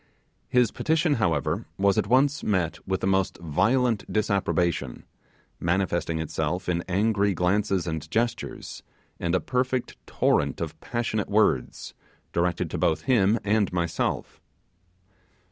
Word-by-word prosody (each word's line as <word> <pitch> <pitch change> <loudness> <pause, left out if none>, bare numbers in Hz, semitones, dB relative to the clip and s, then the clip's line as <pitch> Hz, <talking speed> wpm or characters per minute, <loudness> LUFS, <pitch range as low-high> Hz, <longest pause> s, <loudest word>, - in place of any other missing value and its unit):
His 125 -3 +3
petition, 160 0 +1
however, 85 -5 0
was 100 0 +3
at - - 0
once 135 +5 +3
met 90 -5 0
with 95 0 -1
the - - -1
most 95 0 +1
violent 110 - +1
disapprobation, 85 - 0 0.5
manifesting 85 -2 0
itself 80 +3 -2
in 85 -1 0
angry 100 +1 +2
glances 95 +1 +1
and 80 -2 -4
gestures, 115 +5 -2 0.4
and 85 +1 0
a - - +3
perfect 125 0 -1
torrent - - +1
of - - -5
passionate 115 -3 -2
words, 105 +1 +1 0.4
directed 85 0 0
to - - -3
both 80 0 +1
him 115 -4 +3
and 105 0 +2
myself. 85 -2 -2
95 Hz, 125 wpm, -26 LUFS, 85-110 Hz, 0.5 s, His